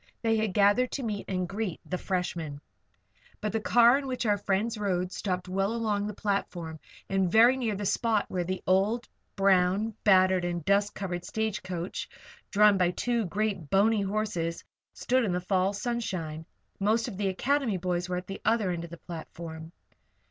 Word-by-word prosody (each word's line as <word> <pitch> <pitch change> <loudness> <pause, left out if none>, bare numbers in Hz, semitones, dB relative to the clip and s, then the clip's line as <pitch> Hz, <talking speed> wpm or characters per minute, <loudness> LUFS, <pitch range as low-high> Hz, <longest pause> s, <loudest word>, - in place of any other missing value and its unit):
They 225 -1 +3
had 215 -4 -1
gathered 205 +5 +4
to 275 - -3
meet 210 -3 -3
and 185 -2 -1
greet 195 -2 -3 0.2
"freshmen." 170 -6 -3 0.8
But 215 - -2
the 225 - 0
car 240 +4 +5
in 275 - -6
which 255 -2 -2
our 205 -2 +2
friends 205 +4 0
rode 185 -3 -1
stopped 185 -2 -3
well 195 +3 0
along 210 -3 -1
the 210 - -5
platform 175 -6 -3 0.3
and 190 -2 +1
very 235 +5 +7
near 235 -5 -1
the 205 +1 -4
spot 220 +1 +1
where 180 -1 -2
the 185 +2 -4
old, 200 +6 +2 0.3
brown, 195 +2 +3
battered, 185 -2 +5
and 175 -2 -3
dust 200 +1 +2
covered 175 -3 -4
stage 220 0 -2
coach, 180 -1 -5 0.4
drawn 210 -1 +5
by 180 -1 +4
two 235 +4 -1
great, 195 -5 -2
bony 205 +2 +3
horses, 195 -5 -2 0.3
stood 255 0 +1
in 195 -5 0
the 180 - 0
fall 185 +1 +1
sunshine. 185 -8 -3 0.3
Most 220 +4 +2
of 230 - -6
the 200 -1 0
Academy 240 +2 0
boys 180 0 -2
were 180 - -1
at 180 - -5
the 195 +1 -7
other 220 -5 +2
end 170 -1 -3
of 170 - -8
the 170 - -9
platform. 160 -1 -8
195 Hz, 175 wpm, -28 LUFS, 180-220 Hz, 0.8 s, very